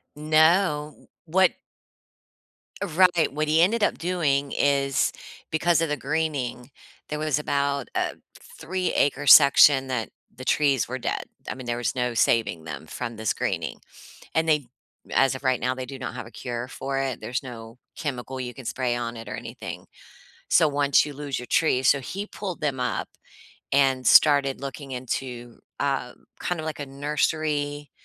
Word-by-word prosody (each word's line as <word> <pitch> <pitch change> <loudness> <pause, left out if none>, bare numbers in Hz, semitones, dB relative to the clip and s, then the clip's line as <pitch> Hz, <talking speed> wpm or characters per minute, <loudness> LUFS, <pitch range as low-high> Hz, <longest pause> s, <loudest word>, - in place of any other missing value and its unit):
No. 155 0 +2 0.2
What 185 +2 +4 1.3
Right. 175 -4 +3
What 155 +1 -1
he 155 +2 +4
ended 210 +5 +3
up - - +2
doing 145 -6 0
is, 140 -1 +2 0.4
because 165 +1 +2
of 165 - 0
the 150 - -1
greening, 140 -4 -2 0.4
there 150 - -3
was 150 -2 0
about 140 -2 -1
a - - -1 0.4
3 185 +1 -2
acre 145 0 +1
section 140 -1 +8
that, 125 -4 -2 0.3
the 130 - -9
trees 140 -4 +2
were 130 +2 -4
dead. - - -2 0.3
I - - -3
mean, 130 -1 -9
there 120 0 -2
was 120 - -2
no 125 -1 -1
saving 110 -7 +1
them 80 0 -7
from 115 +8 -6
this 110 -1 -1
greening, - - -3 0.5
and 160 0 +1
they 150 -3 +2 0.5
as 135 0 +3
of 130 - -8
right 130 -1 +2
now, 125 +1 -1
they 130 0 -5
do 135 +1 -9
not 125 - -5
have - - -6
a - - -13
cure 120 -1 -5
for 135 +1 -4
it, 135 -2 -2
there's 125 +3 -3
no 115 -2 -9 0.2
chemical 130 -3 -5
you 125 -1 -5
can 130 - -10
spray 125 0 -1
on 120 -1 -4
it 115 0 -9
or - - -4
anything. - - -8 0.6
So, 160 - +5
once 145 -1 +3
you 145 - -7
lose 140 -1 -4
your 125 - -8
tree 130 -3 +2
so 140 - +4
he 195 +10 -5
pulled 190 -5 -6
them 140 -4 -1
up, 125 0 -2 0.6
and 135 -2 +3
started 140 -3 +5
looking 140 0 -7
into, 125 -1 -5 0.2
uh, 135 -3 -1 0.3
kind 180 -2 -2
of 155 - -5
like 155 -1 -4
a - - -4
nursery, 145 +1 -1
140 Hz, 170 wpm, -25 LUFS, 125-155 Hz, 1.3 s, section